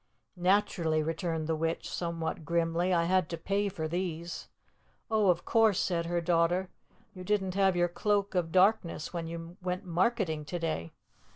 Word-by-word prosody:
"Naturally," 175 -4 +2
returned 165 0 -2
the 160 0 0
witch, 165 +1 -2
somewhat 165 -2 -3
grimly. 170 +2 +1
"I 170 -2 +3
had 180 -1 +2
to 170 - -4
pay 200 +4 0
for 165 -5 -4
these." 170 0 -4 0.6
"Oh, 215 -3 +3
of 175 -1 +1
course," 220 -4 +4
said 170 -2 0
her 175 0 0
daughter. 175 +2 +2 0.4
"You 185 - -9
didn't 190 -1 0
have 195 -1 +3
your 175 0 +3
Cloak 200 +3 0
of 175 -3 0
Darkness 185 -4 +2
when 170 -2 -3
you 170 +1 -7
went 180 +2 -3
marketing 180 -3 0
to 175 - -4
day." 155 - -3
175 Hz, 165 wpm, -30 LUFS, 165-190 Hz, 0.6 s, course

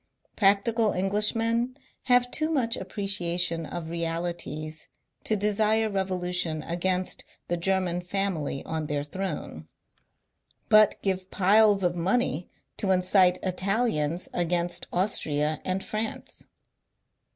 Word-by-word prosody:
Practical 210 +2 +3
Englishmen 225 +6 +1 0.3
have 245 -1 +3
too 310 0 0
much 250 -7 +1
appreciation 175 -5 -1
of 165 -2 -6
realities 165 -2 -4 0.4
to 220 - +1
desire 215 +1 +1
revolution 180 -4 -2
against 180 +2 -1 0.3
the 175 - +1
German 180 0 0
family 180 -7 -2
on 160 -1 -3
their 145 -1 -2
throne, 150 - -5 1.0
but 215 -1 +5
give 190 -1 -2
piles 205 +1 +4
of 175 -1 +1
money 180 - 0 0.3
to 200 - -1
incite 185 0 +4
Italians 185 -4 0
against 175 0 -1
Austria 155 -5 0
and 185 +1 -2
France. 215 +1 -4
185 Hz, 105 wpm, -27 LUFS, 170-210 Hz, 1.0 s, but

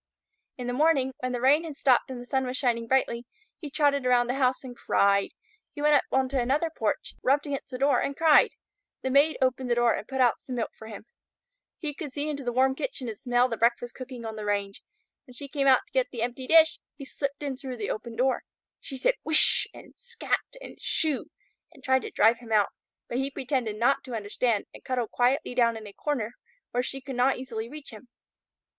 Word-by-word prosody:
In 250 - -5
the 245 - -2
morning, 270 -2 +2
when 255 0 -2
the 245 - -2
rain 280 +6 +4
had 310 -4 -7
stopped 260 -2 +3
and 255 -2 -6
the 245 - -9
sun 265 +1 -1
was 250 +1 -1
shining 235 -3 0
brightly, 240 -2 +1 0.3
he 300 - -7
trotted 285 -1 +2
around 250 -1 +3
the 245 - -1
house 260 -1 +1
and 250 -2 -8
cried. 200 -3 +2 0.5
He 290 - -6
went 300 0 +5
up 285 - +4
on 265 0 +2
to 270 0 0
another 290 +7 0
porch, 215 -2 -2
rubbed 280 +3 +2
against 280 -2 -4
the 255 - -5
door 275 -1 +3
and 280 - -3
cried. 320 -2 +6 0.5
The 260 - -1
Maid 285 +4 +4
opened 255 0 0
the 240 - +3
door 240 -1 +3
and - - -5
put 265 -1 -4
out 245 -2 +3
some 255 - -6
milk 235 - -2
for 220 - -11
him. 215 -1 -9 0.7
He 300 -3 -4
could 295 -1 -7
see 290 +2 -2
into 285 -2 -4
the 245 - -1
warm 260 +2 +3
kitchen 275 - -4
and 225 - -4
smell 245 +2 +2
the 230 -3 -4
breakfast 240 +1 +1
cooking 255 -2 -8
on 220 -1 -5
the 215 - -6
range. 200 -1 -2 0.5
When 250 - -14
she 280 +3 -6
came 275 -1 -1
out 260 -2 +6
to - - -26
get 260 -1 +2
the 235 -3 -4
empty 245 +2 -4
dish, 320 -1 +6 0.2
he 275 -1 -9
slipped 280 +1 -4
in 280 -2 -2
through 255 -1 -7
the 210 - -3
open 225 +2 -6
door. 260 +2 +1 0.4
She 270 - -6
said - - +2
"Whish!" 315 -1 +4
and - - -14
"Scat!" 485 0 -3
and - - -11
"Shoo!" 310 -5 0 0.5
and 275 -4 -18
tried 260 0 +3
to - - -6
drive 225 +2 +3
him 235 -2 -12
out, 210 -2 +4 0.4
but 240 - -2
he 270 +1 -1
pretended 255 -5 -2
not 245 +6 +2
to 250 -3 -5
understand 215 +1 -1
and - - -13
cuddled 250 -3 -2
quietly 250 +1 +1
down 235 -2 +2
in 220 - -9
a 205 - -10
corner 245 -5 -2 0.4
where 245 - +1
she 270 +2 -5
could 265 0 -7
not 260 +2 +3
easily 235 -3 -5
reach 295 0 -9
him. 225 +3 -13
255 Hz, 230 wpm, -27 LUFS, 240-275 Hz, 0.7 s, cried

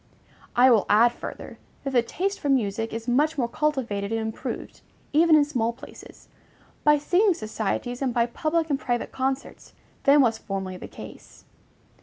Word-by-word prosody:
I 250 +1 +6
will 220 -4 +3
add 230 +3 +5
further, - - -9 0.2
that 275 - -3
the 245 - +5
taste 385 +11 -3
for 290 - -3
music 225 -4 0
is 225 +1 -6
much 295 +6 +2
more 245 -4 +1
cultivated 235 -8 -2
and 225 - 0
improved, 220 0 -5 0.3
even 320 +1 +5
in 295 -1 +5
small 235 -6 -1
places, 265 +5 -14 0.6
by 295 0 +5
singing 360 +6 +2
societies 220 +3 -3
and 265 -2 0
by 235 0 +2
public 315 +6 -1
and 275 - +1
private 240 -1 -2
concerts, 265 +1 -4 0.3
than 280 +1 +6
was 230 -4 +2
formerly 190 -2 -5
the - - -9
case. - - -13
250 Hz, 165 wpm, -25 LUFS, 225-295 Hz, 0.6 s, I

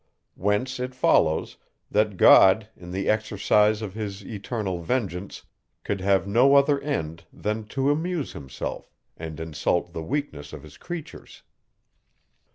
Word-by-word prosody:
Whence 105 +7 -1
it 125 0 -4
follows, 80 -10 +2 0.3
that 105 -2 +1
God, 95 +4 +7
in 90 0 -12
the 95 +2 -3
exercise 105 0 +2
of 100 -3 -5
his 100 -2 -6
eternal 105 -4 -4
vengeance, 95 -2 -3 0.4
could 100 -2 -3
have 95 0 +2
no 125 +8 +4
other 140 0 +4
end 85 - -4
than 105 +1 -3
to 135 +6 0
amuse 160 0 -2
himself, 65 -2 -6 0.3
and 80 -1 -7
insult 80 +2 -1
the 80 - -4
weakness 120 - -4
of 75 -2 -9
his 75 -1 -14
creatures. 175 -3 -9
105 Hz, 135 wpm, -25 LUFS, 90-125 Hz, 0.4 s, God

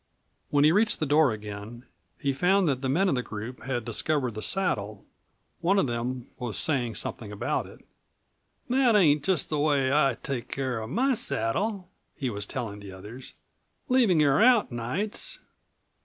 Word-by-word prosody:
When 145 0 +3
he 155 - +6
reached 210 +5 +2
the 155 - 0
door 145 -2 +4
again 105 +3 -7 0.3
he 140 -1 -1
found 180 +6 +3
that 135 -3 0
the 135 - -1
men 180 +9 +2
of - - +2
the 125 - 0
group 115 +2 -7
had 125 -3 -2
discovered 125 +2 -1
the 110 - -6
saddle. 105 - -1 0.5
One 185 +4 +2
of 195 - +3
them 120 +1 -3
was 120 -4 -3
saying 125 -8 0
something 105 -3 -3
about 105 - -2
it. - - -16 0.8
"That 250 -2 +3
ain't 150 -7 +4
just 185 -5 0
the 150 - 0
way 145 -3 +2
I 145 -2 +3
take 130 -4 -3
care 130 -4 -2
of 110 0 -6
my 260 - +2
saddle," 185 - -1 0.3
he 130 -3 -2
was 100 -1 -4
telling 110 -6 -5
the 100 -1 -10
others; 105 +7 -10 0.5
"leavin' 235 -10 +4
her 140 -1 +4
out 240 - +5
nights." 190 - -3
135 Hz, 170 wpm, -27 LUFS, 115-180 Hz, 0.8 s, he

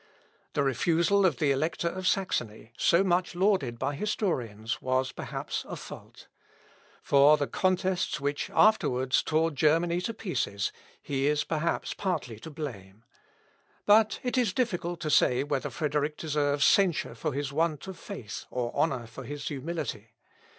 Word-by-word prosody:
The 145 - +1
refusal 170 - +3
of 150 -8 -1
the 145 +1 +2
Elector 160 +5 0
of 185 +2 -2
Saxony, 120 - -1
so 170 +8 +3
much 180 -1 +1
lauded 180 - +1
by 145 - -1
historians, 125 - -2
was 130 +1 0
perhaps - - -4
a - - -4
fault. - - -11 0.8
For 145 +2 +6
the 145 - 0
contests 185 -1 0
which 145 +1 -2
afterwards 130 -12 +3
tore 160 +1 +1
Germany 165 +4 +2
to 230 - -3
pieces 135 - -2 0.3
he 135 0 -1
is 150 0 +2
perhaps 165 +1 -1
partly 125 - -3
to 160 - -9
blame. 115 -10 -8 0.8
But 215 +1 +5
it 255 +1 0
is 225 -6 +1
difficult 175 -8 -1
to 155 - -1
say 130 -3 +4
whether 140 -2 -2
Frederick 150 -1 -1
deserves 145 -2 +1
censure 190 -5 +3
for - - -3
his 140 0 -3
want 155 -2 0
of 190 -1 -7
faith 105 -3 -7
or 120 -1 -3
honour 130 -7 0
for 115 +4 -10
his 145 +3 -5
humility. 140 -7 -5
150 Hz, 150 wpm, -28 LUFS, 130-175 Hz, 0.8 s, For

